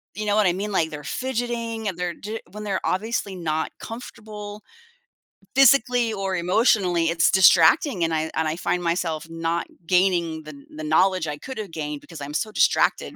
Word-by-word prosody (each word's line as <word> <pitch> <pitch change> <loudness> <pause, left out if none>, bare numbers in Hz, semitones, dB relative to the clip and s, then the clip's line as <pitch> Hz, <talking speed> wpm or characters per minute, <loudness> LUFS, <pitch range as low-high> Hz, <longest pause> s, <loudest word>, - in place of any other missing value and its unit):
you 215 - -4
know 205 - +2
what 215 -2 +3
I 175 - +3
mean? 205 +3 -4
Like 160 -4 +1
they're 150 -1 -7
fidgeting, 235 - -3
and 185 - -3
they're 180 -1 -2
j 215 +2 -6
when 210 +1 -8
they're 195 -2 -1
obviously 205 0 -2
not 160 -3 -2
comfortable, 210 -3 -9 0.9
physically 245 -3 +4
or 195 -2 -2
emotionally, 180 -2 +2
it's 165 -1 +3
distracting, 185 - +5
and 165 0 0
I 160 0 -1
and 160 - 0
I 155 - -1
find 180 0 -1
myself 170 -2 -2
not 165 +1 -2 0.2
gaining 175 -3 +1
the 155 0 -10
kn 140 - -15
the 155 - -6
knowledge 180 +2 +2
I 150 0 -4
could've 215 - -7
gained 150 -2 -4
because 165 -4 -11
I'm 145 +1 -6
so 215 +7 -2
distracted - - +2
185 Hz, 185 wpm, -23 LUFS, 165-215 Hz, 0.9 s, distracting